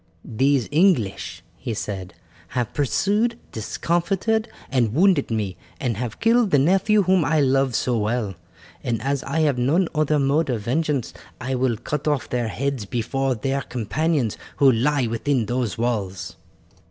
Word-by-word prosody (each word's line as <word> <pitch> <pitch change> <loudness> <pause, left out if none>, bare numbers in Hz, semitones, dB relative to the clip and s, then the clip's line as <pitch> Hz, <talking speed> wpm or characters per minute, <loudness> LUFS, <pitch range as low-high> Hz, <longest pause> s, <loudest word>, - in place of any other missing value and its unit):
"These 135 +2 +1
English," 155 - +1
he 115 - -4
said, 95 -4 -5 0.4
"have 120 -3 -1
pursued, 205 - +1
discomforted, 190 - 0 0.2
and 120 -4 +1
wounded 185 +3 +4
me, 105 -6 -2 0.2
and 120 -4 -1
have 120 -1 -4
killed 230 -1 +3
the 145 - +4
nephew 195 +8 +3
whom 185 -1 +3
I 155 +2 +2
loved 135 -2 +2
so 120 -1 +1
well, 105 -1 -1 0.5
and 120 -5 -1
as 140 0 0
I 160 +4 -1
have 145 -5 +2
none 160 +9 +2
other 155 -1 +2
mode 145 +2 +2
of 120 -4 -1
vengeance 140 +2 -1 0.3
I 130 +1 -3
will 125 -3 +1
cut 150 +6 -4
off 145 -5 0
their 120 -2 -1
heads 130 0 -2
before 130 +5 -1
their 135 +4 -1
companions 130 +1 -1 0.2
who 135 -2 +6
lie 130 +3 +1
within 115 +2 0
those 120 -4 -2
walls." 100 -7 -2
135 Hz, 155 wpm, -23 LUFS, 115-155 Hz, 0.5 s, who